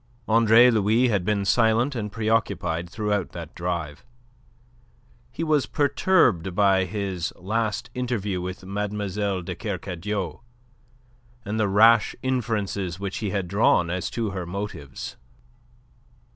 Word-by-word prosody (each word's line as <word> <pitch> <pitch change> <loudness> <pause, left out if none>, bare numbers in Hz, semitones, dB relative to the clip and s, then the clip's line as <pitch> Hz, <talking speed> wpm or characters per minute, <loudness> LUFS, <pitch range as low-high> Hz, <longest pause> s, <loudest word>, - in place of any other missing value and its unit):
Andre 115 +2 +6
Louis 110 +3 +3
had 100 -5 +1
been 100 +1 0
silent 115 +5 +3
and 105 -4 -4
preoccupied 105 -6 -1
throughout 105 -2 -2
that 85 -2 -8
drive. 85 -4 -4 1.3
He - - -4
was 155 -4 +2
perturbed 145 - +2
by 95 -2 +4
his 95 -3 -3
last 110 +4 -2
interview 110 -7 -2
with 90 +1 -6
Mademoiselle 100 -1 -2
de - - -4
Kercadiou 90 -2 -4 1.1
and 105 +2 -2
the 110 - +2
rash 110 +3 +5
inferences 105 -8 -2
which 100 -1 -4
he 105 - -2
had 95 -2 -2
drawn 90 -3 +3
as 90 -1 -2
to 115 -3 -2
her 90 -3 -5
motives. 90 -8 -6
100 Hz, 120 wpm, -25 LUFS, 90-110 Hz, 1.3 s, Andre